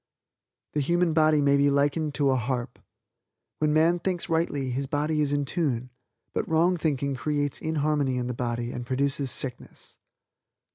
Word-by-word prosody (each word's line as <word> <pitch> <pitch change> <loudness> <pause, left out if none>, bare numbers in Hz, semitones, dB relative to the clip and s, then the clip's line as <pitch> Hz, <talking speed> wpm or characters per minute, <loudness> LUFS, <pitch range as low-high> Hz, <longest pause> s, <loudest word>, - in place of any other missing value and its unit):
The 150 - 0
human 170 +3 +1
body 155 -2 +4
may 140 0 +4
be 140 0 +4
likened 145 +2 +1
to 140 -3 +2
a - - +2
harp. 125 0 -3 0.8
When 150 -1 +2
man 165 +3 +3
thinks 180 0 -2
rightly 145 -5 0
his 135 +2 -2
body 150 +2 0
is 145 -1 +1
in 145 0 0
tune; 130 -6 -2 0.4
but - - -2
wrong 165 +3 +3
thinking 140 -4 -1
creates 145 +2 -2
inharmony 150 -4 0
in 125 - -2
the 125 - -3
body 120 0 -3
and 125 - -5
produces 135 +2 -1
sickness. 125 0 -3
145 Hz, 160 wpm, -26 LUFS, 130-155 Hz, 0.8 s, body